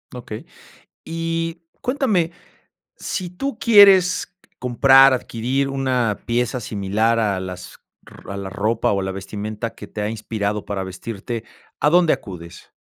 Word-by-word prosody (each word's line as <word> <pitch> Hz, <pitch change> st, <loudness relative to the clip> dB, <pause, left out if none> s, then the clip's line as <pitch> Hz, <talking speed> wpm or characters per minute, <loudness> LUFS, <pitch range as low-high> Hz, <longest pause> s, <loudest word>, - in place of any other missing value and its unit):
Okey. 115 Hz, -3 st, -7 dB, 0.6 s
Y 165 Hz, 0 st, -3 dB, 0.2 s
cuéntame, 220 Hz, -, +1 dB, 0.7 s
si 185 Hz, -5 st, -4 dB
tú 255 Hz, +6 st, -4 dB
quieres 195 Hz, -6 st, +6 dB, 0.2 s
comprar, 135 Hz, +2 st, +6 dB
adquirir 130 Hz, +3 st, -1 dB
una 130 Hz, -6 st, 0 dB
pieza 120 Hz, +1 st, 0 dB
similar 105 Hz, +2 st, 0 dB
a 100 Hz, -3 st, +1 dB
las 90 Hz, -1 st, -8 dB, 0.3 s
r 100 Hz, -, -11 dB
a -, -, -5 dB
la 95 Hz, -1 st, -5 dB
ropa 105 Hz, +3 st, 0 dB
o 100 Hz, -, 0 dB
a -, -, -3 dB
la 95 Hz, 0 st, -3 dB
vestimenta 105 Hz, +3 st, -5 dB
que 105 Hz, -, -10 dB
te 105 Hz, -, -7 dB
ha 105 Hz, -, -1 dB
inspirado 105 Hz, -1 st, -3 dB
para 100 Hz, -2 st, -3 dB
vestirte, 110 Hz, +4 st, -6 dB, 0.4 s
¿a 150 Hz, -, +4 dB
dónde 175 Hz, -1 st, +5 dB
acudes? 85 Hz, -4 st, -11 dB
115 Hz, 140 wpm, -21 LUFS, 105-165 Hz, 0.7 s, quieres